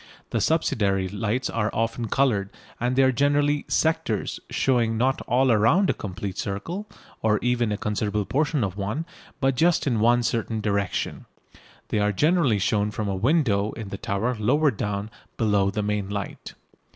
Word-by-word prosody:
The -, -, 0 dB
subsidiary 100 Hz, -, +1 dB
lights 110 Hz, +6 st, -2 dB
are 110 Hz, -2 st, -1 dB
often 115 Hz, +1 st, -1 dB
coloured, 110 Hz, -6 st, +1 dB, 0.3 s
and 125 Hz, +2 st, 0 dB
they 135 Hz, -, +5 dB
are 130 Hz, -, +4 dB
generally 145 Hz, +2 st, +2 dB
"sectors" 160 Hz, 0 st, 0 dB
showing 115 Hz, -4 st, +1 dB
not 130 Hz, +3 st, +1 dB
all 125 Hz, -1 st, +3 dB
round 160 Hz, -, +4 dB
a -, -, -1 dB
complete 95 Hz, -1 st, -6 dB
circle, 165 Hz, -, -4 dB, 0.3 s
or 105 Hz, -1 st, +3 dB
even 120 Hz, -2 st, +1 dB
a 105 Hz, -, -1 dB
considerable 105 Hz, -1 st, -1 dB
portion 145 Hz, 0 st, 0 dB
of 95 Hz, -2 st, -2 dB
one, 105 Hz, +11 st, -2 dB, 0.3 s
but 135 Hz, 0 st, +2 dB
just 165 Hz, +6 st, +2 dB
in 120 Hz, -6 st, +1 dB
one 120 Hz, +2 st, +4 dB
certain 115 Hz, -1 st, -1 dB
direction. 100 Hz, -2 st, -2 dB, 0.6 s
They 105 Hz, -, 0 dB
are 105 Hz, 0 st, +2 dB
generally 150 Hz, -, +2 dB
shown 105 Hz, +1 st, +1 dB
from 105 Hz, 0 st, -3 dB
a 95 Hz, -, -1 dB
window 110 Hz, -, +1 dB
in 110 Hz, -4 st, -7 dB
the 100 Hz, -, -5 dB
tower 110 Hz, +6 st, -1 dB
lower 145 Hz, +7 st, +3 dB
down 105 Hz, -1 st, -3 dB, 0.3 s
below 105 Hz, -3 st, +2 dB
the 105 Hz, +1 st, -2 dB
main 105 Hz, -1 st, -1 dB
light. 100 Hz, -1 st, -6 dB
110 Hz, 165 wpm, -25 LUFS, 105-135 Hz, 0.6 s, they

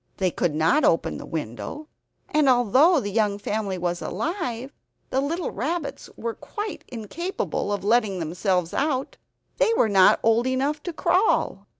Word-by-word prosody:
They 185 Hz, -2 st, +1 dB
could 160 Hz, -2 st, -1 dB
not 160 Hz, -, +3 dB
open 165 Hz, -, +2 dB
the -, -, -9 dB
window; 145 Hz, -, -5 dB, 0.4 s
and 300 Hz, -2 st, +3 dB
although 260 Hz, -, +5 dB
the 205 Hz, -5 st, -4 dB
young 205 Hz, -1 st, +1 dB
family 205 Hz, -2 st, -2 dB
was 175 Hz, 0 st, -2 dB
alive 275 Hz, -, -3 dB, 0.4 s
the 265 Hz, -, +1 dB
little 330 Hz, +5 st, -2 dB
rabbits 295 Hz, -, -4 dB
were 230 Hz, 0 st, -3 dB
quite 420 Hz, -, -6 dB
incapable 250 Hz, -, -4 dB
of 205 Hz, -1 st, -2 dB
letting 215 Hz, -2 st, +2 dB
themselves 180 Hz, +1 st, -1 dB
out; 275 Hz, -2 st, -1 dB, 0.4 s
they -, -, +3 dB
were 225 Hz, -, +3 dB
not 190 Hz, -2 st, +6 dB
old 230 Hz, +2 st, +3 dB
enough 275 Hz, +4 st, 0 dB
to -, -, -2 dB
crawl. 365 Hz, +5 st, +1 dB
235 Hz, 155 wpm, -24 LUFS, 195-300 Hz, 0.4 s, not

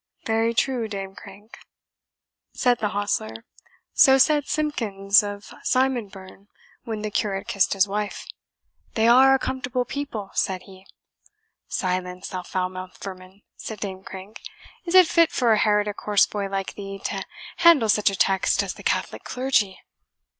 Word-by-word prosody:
"Very 225 Hz, +1 st, +1 dB
true, 245 Hz, -2 st, 0 dB
Dame 195 Hz, -2 st, -6 dB
Crank," 205 Hz, +2 st, -14 dB, 1.0 s
said 245 Hz, -2 st, +2 dB
the 210 Hz, -, 0 dB
hostler; 115 Hz, -, -3 dB, 0.5 s
"so 270 Hz, -3 st, +6 dB
said 295 Hz, +1 st, +3 dB
Simpkins 210 Hz, -10 st, +1 dB
of 205 Hz, -1 st, -7 dB
Simonburn 210 Hz, -7 st, -2 dB, 0.4 s
when 220 Hz, -2 st, -4 dB
the 215 Hz, -, -3 dB
curate 195 Hz, -2 st, -2 dB
kissed 200 Hz, -, +1 dB
his 195 Hz, 0 st, +3 dB
wife, 205 Hz, +1 st, -4 dB, 0.7 s
'They 225 Hz, -1 st, +3 dB
are 265 Hz, +3 st, +7 dB
a -, -, +3 dB
comfortable 255 Hz, -1 st, -3 dB
people,' 255 Hz, -7 st, -5 dB
said 185 Hz, -1 st, -1 dB
he." 190 Hz, 0 st, -16 dB, 0.8 s
"Silence, 180 Hz, 0 st, -3 dB
thou 185 Hz, -, -4 dB
foul 185 Hz, 0 st, -2 dB
mouthed 185 Hz, 0 st, -9 dB
vermin," 190 Hz, +1 st, -10 dB
said 220 Hz, -2 st, -7 dB
Dame 190 Hz, -2 st, -5 dB
Crank; 190 Hz, +2 st, -10 dB, 0.4 s
"is 345 Hz, +1 st, -1 dB
it 370 Hz, -1 st, +9 dB
fit 335 Hz, 0 st, +3 dB
for 235 Hz, -3 st, +2 dB
a 215 Hz, -, +2 dB
heretic 210 Hz, -1 st, +1 dB
horse 210 Hz, -1 st, +4 dB
boy 200 Hz, -2 st, -4 dB
like 195 Hz, -1 st, -3 dB
thee 195 Hz, -1 st, -8 dB
to 195 Hz, -1 st, -2 dB, 0.3 s
handle 325 Hz, -9 st, +6 dB
such 210 Hz, 0 st, +3 dB
a 195 Hz, -, -4 dB
text 190 Hz, 0 st, +2 dB
as -, -, -4 dB
the -, -, -13 dB
Catholic -, -, -2 dB
clergy?" 250 Hz, -7 st, 0 dB
205 Hz, 155 wpm, -24 LUFS, 195-245 Hz, 1.0 s, it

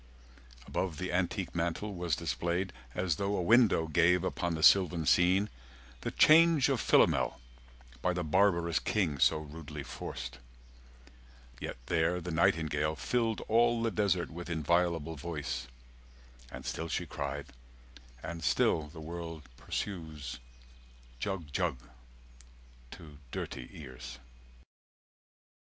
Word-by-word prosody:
Above 90 Hz, -5 st, -2 dB
the 90 Hz, +1 st, -3 dB
antique 90 Hz, +1 st, -1 dB
mantel 85 Hz, +5 st, -2 dB
was 85 Hz, -4 st, -1 dB
displayed 85 Hz, +2 st, -2 dB, 0.2 s
As 90 Hz, -4 st, 0 dB
though 100 Hz, +1 st, -1 dB
a -, -, 0 dB
window 110 Hz, -4 st, +5 dB
gave 85 Hz, +2 st, +3 dB
upon 85 Hz, -1 st, -1 dB
the 80 Hz, -, -3 dB
sylvan 90 Hz, -3 st, +5 dB
scene 90 Hz, +7 st, +4 dB, 0.5 s
The -, -, -3 dB
change 160 Hz, -3 st, +6 dB
of 135 Hz, -5 st, +1 dB
Philomel, -, -, +3 dB, 0.6 s
by 90 Hz, -, +2 dB
the 90 Hz, 0 st, -2 dB
barbarous 85 Hz, 0 st, +2 dB
king 85 Hz, -10 st, 0 dB
So -, -, +4 dB
rudely 75 Hz, -1 st, -8 dB
forced; 60 Hz, -1 st, -7 dB, 1.2 s
yet -, -, -5 dB
there 85 Hz, +1 st, +1 dB
the 90 Hz, 0 st, -5 dB
nightingale 80 Hz, -1 st, +2 dB
100 -, -, -12 dB
Filled 115 Hz, -3 st, 0 dB
all 115 Hz, +1 st, +3 dB
the 115 Hz, -, +1 dB
desert 100 Hz, -6 st, 0 dB
with 85 Hz, +1 st, -7 dB
inviolable 85 Hz, 0 st, 0 dB
voice 75 Hz, 0 st, -4 dB, 0.8 s
And -, -, -8 dB
still 80 Hz, -, -3 dB
she -, -, -2 dB
cried, 70 Hz, 0 st, -4 dB, 0.8 s
and 80 Hz, +1 st, -6 dB
still 75 Hz, -1 st, +2 dB
the 80 Hz, +1 st, -11 dB
world 80 Hz, -1 st, -6 dB
pursues, 80 Hz, -6 st, -5 dB, 0.8 s
"Jug 85 Hz, -4 st, -4 dB
Jug" 65 Hz, -, 0 dB, 1.1 s
to 75 Hz, 0 st, -12 dB
dirty 65 Hz, -3 st, -5 dB
ears. 65 Hz, -3 st, -9 dB
85 Hz, 120 wpm, -31 LUFS, 80-95 Hz, 1.2 s, change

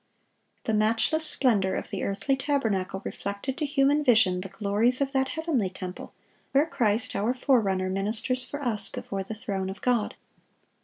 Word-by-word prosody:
The 220 Hz, -, -1 dB
matchless 225 Hz, +9 st, +2 dB
splendor 210 Hz, -10 st, +2 dB
of -, -, -5 dB
the -, -, -3 dB
earthly 235 Hz, +8 st, 0 dB
tabernacle 225 Hz, -10 st, -1 dB
reflected 200 Hz, +7 st, -4 dB
to 300 Hz, -, 0 dB
human 285 Hz, +1 st, +3 dB
vision 215 Hz, -8 st, +4 dB
the 195 Hz, -, -7 dB
glories 215 Hz, +5 st, +1 dB
of 275 Hz, -1 st, 0 dB
that 265 Hz, -1 st, +1 dB
heavenly 300 Hz, -, -1 dB
temple 185 Hz, 0 st, -7 dB, 0.4 s
where 280 Hz, +2 st, +5 dB
Christ 225 Hz, -7 st, 0 dB
our 225 Hz, +5 st, +1 dB
forerunner 210 Hz, -8 st, +2 dB
ministers 220 Hz, +6 st, -1 dB
for 285 Hz, +3 st, -6 dB
us 225 Hz, -5 st, 0 dB
before 195 Hz, -1 st, -5 dB
the 205 Hz, +3 st, -6 dB
throne 200 Hz, -5 st, -3 dB
of 195 Hz, +1 st, -7 dB
God. 240 Hz, -4 st, +1 dB
225 Hz, 160 wpm, -27 LUFS, 195-270 Hz, 0.4 s, where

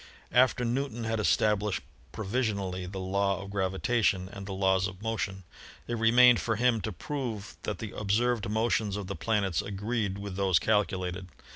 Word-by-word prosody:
After 125 Hz, 0 st, +4 dB
Newton 120 Hz, -1 st, -2 dB
had 110 Hz, 0 st, -1 dB
established 105 Hz, -1 st, +1 dB, 0.3 s
provisionally 100 Hz, -4 st, -2 dB
the 95 Hz, +1 st, -7 dB
law 100 Hz, 0 st, 0 dB
of 100 Hz, 0 st, -8 dB
gravitation 95 Hz, 0 st, +1 dB
and 100 Hz, -1 st, -8 dB
the -, -, -5 dB
laws 95 Hz, 0 st, +2 dB
of 95 Hz, -1 st, -9 dB
motion, 110 Hz, -4 st, -2 dB, 0.4 s
it 120 Hz, -, -3 dB
remained 120 Hz, +2 st, +6 dB
for 110 Hz, -, 0 dB
him 120 Hz, 0 st, +2 dB
to 110 Hz, -, -3 dB
prove 110 Hz, -, -5 dB
that -, -, -3 dB
the -, -, -7 dB
observed 110 Hz, +2 st, +1 dB
motions 110 Hz, -2 st, +1 dB
of 105 Hz, -, -4 dB
the 100 Hz, -, -5 dB
planets 100 Hz, +1 st, 0 dB
agreed 105 Hz, 0 st, -2 dB
with 100 Hz, -1 st, -6 dB
those 95 Hz, -2 st, +3 dB
calculated. 95 Hz, -1 st, 0 dB
105 Hz, 160 wpm, -29 LUFS, 95-115 Hz, 0.4 s, remained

